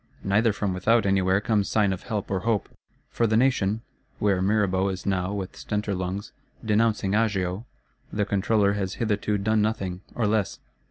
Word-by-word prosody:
Neither 105 +4 +3
from 100 -2 -2
without 110 +4 +2
anywhere 95 -1 +3
comes 105 -1 0
sign 105 -3 +2
of 95 - -6
help 105 -3 -4
or 95 - +1
hope. 110 0 0 0.4
For 115 - +1
the 110 0 +2
Nation 115 -4 +2 0.4
(where 100 -3 +1
Mirabeau 100 -1 +2
is 95 -1 -5
now, 95 -1 0
with 95 -2 -4
stentor 105 -1 -2
lungs, 95 +2 -4 0.3
"denouncing 105 -2 +2
Agio") 105 -1 0 0.4
the 105 -1 0
Controller 100 +1 +2
has 95 -2 -2
hitherto 105 -2 0
done 110 +2 +1
nothing, 95 -4 -2
or 115 - 0
less. 105 -2 0
100 Hz, 165 wpm, -25 LUFS, 95-110 Hz, 0.4 s, Neither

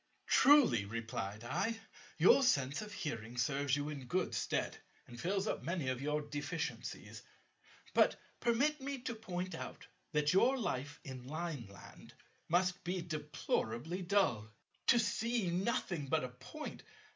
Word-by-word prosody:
"Truly," 265 - +6
replied 110 -1 -4
I, 210 - -1 0.4
"your - - +7
sense 140 - +2
of 210 0 -7
hearing 120 - -5
serves 135 +2 +1
you 145 +1 -2
in 140 -4 -6
good 180 +8 0
stead, - - -1 0.3
and 120 0 -10
fills 195 +2 0
up - - -1
many 165 -6 -1
of 130 0 -2
your 150 +1 0
deficiencies. 145 +3 -4 0.7
But - - +5 0.2
permit 275 +6 +2
me 275 +1 -3
to 245 -1 -3
point 185 -4 -4
out - - -7 0.3
that 150 +1 +3
your 245 +8 +5
life 145 - -2
in 130 -3 -8
Lineland 140 - -7 0.3
must 180 +2 +2
be 180 0 -2
deplorably 150 -1 -2
dull. 175 - +2 0.4
To 240 - +7
see 230 -3 +1
nothing 175 -5 -1
but 155 +1 +1
a 130 - -3
Point! 300 - -8
160 Hz, 140 wpm, -36 LUFS, 130-200 Hz, 0.7 s, your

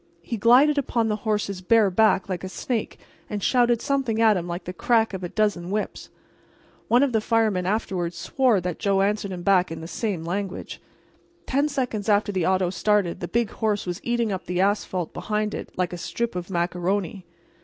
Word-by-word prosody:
He 235 - -4
glided 255 +7 +5
upon 235 -4 0
the 210 - +1
horse's 200 -3 -1
bare 210 +1 +4
back 215 -1 +3
like 185 -3 -4
a 190 - -4
snake 220 +5 -3 0.3
and 205 -2 -4
shouted 240 -2 +3
something 270 -6 0
at 220 -2 +5
him 175 -2 -3
like 175 +1 -4
the 180 - -6
crack 225 +3 +2
of 190 -1 -5
a 175 - -3
dozen 200 -5 0
whips. 210 +2 -3 0.8
One 245 +3 +4
of 280 - +1
the 220 -2 +1
firemen 215 -5 +1
afterward 185 -4 -1
swore 250 +1 +2
that 180 -1 -4
Joe 195 -1 +2
answered 205 -1 -1
him 180 -1 -6
back 185 -3 +3
in 165 - -5
the 160 - -7
same 195 -3 -3
language. 190 +2 -4 0.6
Ten 285 +3 +1
seconds 245 -7 -2
after 205 0 +3
the 185 -4 0
auto 185 -1 +2
started 205 -3 +1
the 175 - -4
big 235 +1 0
horse 215 -2 -1
was 175 -1 -4
eating 235 -2 0
up 190 -1 -4
the 180 0 -2
asphalt 190 -3 0
behind 210 0 -2
it - - -6
like 180 -1 -1
a 175 - -5
strip 235 +3 -3
of 180 0 -5
macaroni. 180 +2 -1
205 Hz, 195 wpm, -24 LUFS, 180-225 Hz, 0.8 s, glided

